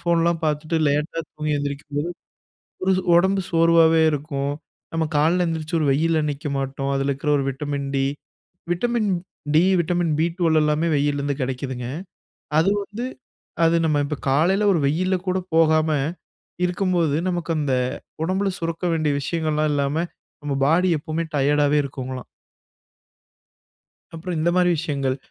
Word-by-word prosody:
ஃபோன்லாம் 170 -1 +1
பார்த்துட்டு 155 +2 0
லேட்டா 150 +3 -1
தூங்கி 155 0 -3
எழுந்திரிக்கும் 145 0 -4
போது, 155 +4 -1 0.8
ஒரு 190 - +3 0.2
உடம்பு 190 +2 +3
சோர்வாவே 165 -1 +5
இருக்கும். 140 -1 -2 0.4
நம்ம 165 0 0
காலையில 165 +5 +3
எழுந்திரிச்சு 165 0 -2
ஒரு 155 - +1
வெயில்ல 160 +2 +2
நிக்க 145 +1 -5
மாட்டோம். 135 0 -2
அதில 135 +1 0
இருக்கிற 140 +2 -2
ஒரு 140 - 0
vitamin 140 +1 -4
D, 135 - +2 0.7
vitamin 225 +3 0 0.5
D, 165 - +6 0.2
vitamin 170 -1 0
B 165 - +3
12 160 -3 +3
எல்லாமே 150 +2 +1
வெய்யிலருந்து 145 0 0
கிடைக்குதுங்க. 125 -1 -3 0.7
அது 170 - +3
வந்து 210 +5 -6 0.6
அது 165 - +4
நம்ம 155 -2 +2
இப்ப 150 +1 -3
காலையில 175 +9 +3
ஒரு 170 - +2
வெயில்ல 185 +6 +1
கூட 185 0 +1 0.2
போகாம, 160 -1 +4 0.8
இருக்கும்போது, 180 -5 +1
நமக்கு 175 -2 -2
அந்த 140 -3 0 0.5
உடம்புல 190 +3 0
சுரக்க 165 +1 -3
வேண்டிய 155 -3 +1
விஷயங்கள்லாம் 155 -1 0
இல்லாம 140 +1 0 0.4
நம்ம 145 -1 -3
பாடி 175 +5 +3
எப்பவுமே 155 +2 -3
டயர்டாவே 145 +1 +3
இருக்குங்கலாம். 130 -2 -6 1.9
அப்புறம் 170 +1 -4
இந்தமாரி 175 +2 +3
விஷயங்கள். 140 -5 -1
155 Hz, 135 wpm, -23 LUFS, 145-170 Hz, 1.9 s, D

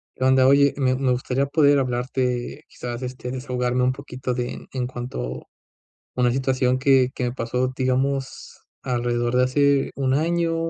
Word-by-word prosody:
¿Qué 130 - -4
onda? 130 0 +5
Oye, 140 0 +5
me 130 -2 +2
me 130 -1 0
gustaría 130 +2 0
poder 145 0 +4
hablarte, 125 -1 -2
quizás, 120 0 -7
este, 125 0 -5
desahogarme 125 -1 -1
un 130 - +2
poquito 130 -2 -5
de 120 0 -5
en 125 -2 -2
cuanto 120 - -5
a - - -13 0.8
una 125 -1 +3
situación 130 0 +1
que 135 -2 +4
que 125 - -2
me 120 - -2
pasó, 125 +1 -1
digamos 130 +1 -2 0.2
alrededor 120 -1 -1
de 125 - +4
hace 140 +2 +2
1 130 -1 0
año 165 +3 +1
130 Hz, 165 wpm, -23 LUFS, 125-135 Hz, 0.8 s, onda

